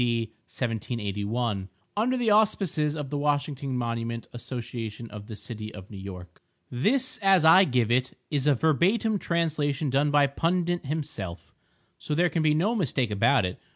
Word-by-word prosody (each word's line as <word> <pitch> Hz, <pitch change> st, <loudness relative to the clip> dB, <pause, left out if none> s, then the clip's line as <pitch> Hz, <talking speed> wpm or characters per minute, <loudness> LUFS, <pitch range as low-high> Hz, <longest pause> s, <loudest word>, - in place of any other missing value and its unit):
D. 115 Hz, -2 st, 0 dB, 0.2 s
1781 110 Hz, -3 st, -2 dB, 0.3 s
Under 240 Hz, +5 st, +1 dB
the 235 Hz, -3 st, +2 dB
Auspices 195 Hz, -8 st, +2 dB
of 145 Hz, -3 st, -5 dB
the 145 Hz, -, -1 dB
Washington 145 Hz, -2 st, -1 dB
Monument 115 Hz, -1 st, -3 dB
Association 120 Hz, -2 st, -6 dB
of 105 Hz, 0 st, -9 dB
the 110 Hz, -, -7 dB
city 110 Hz, -1 st, -7 dB
of 95 Hz, 0 st, -11 dB
New 100 Hz, -, -8 dB
York 90 Hz, -2 st, -9 dB, 0.3 s
This, 255 Hz, -, +1 dB
as 195 Hz, -5 st, +4 dB
I 185 Hz, +4 st, +8 dB
give 125 Hz, -5 st, +1 dB
it, 130 Hz, +2 st, +1 dB
is 145 Hz, -1 st, 0 dB
a 145 Hz, -, +5 dB
verbatim 195 Hz, -, +2 dB
translation 155 Hz, -5 st, 0 dB
done 140 Hz, +3 st, +2 dB
by 145 Hz, -1 st, +5 dB
Pundit 170 Hz, +3 st, 0 dB
himself, 125 Hz, -, -5 dB, 0.5 s
so 150 Hz, -, -3 dB
there 175 Hz, +2 st, +3 dB
can 165 Hz, -, 0 dB
be 155 Hz, -1 st, +3 dB
no 195 Hz, +9 st, +2 dB
mistake 135 Hz, -, 0 dB
about 110 Hz, +3 st, +3 dB
it. 90 Hz, -, -5 dB
140 Hz, 160 wpm, -27 LUFS, 115-165 Hz, 0.5 s, I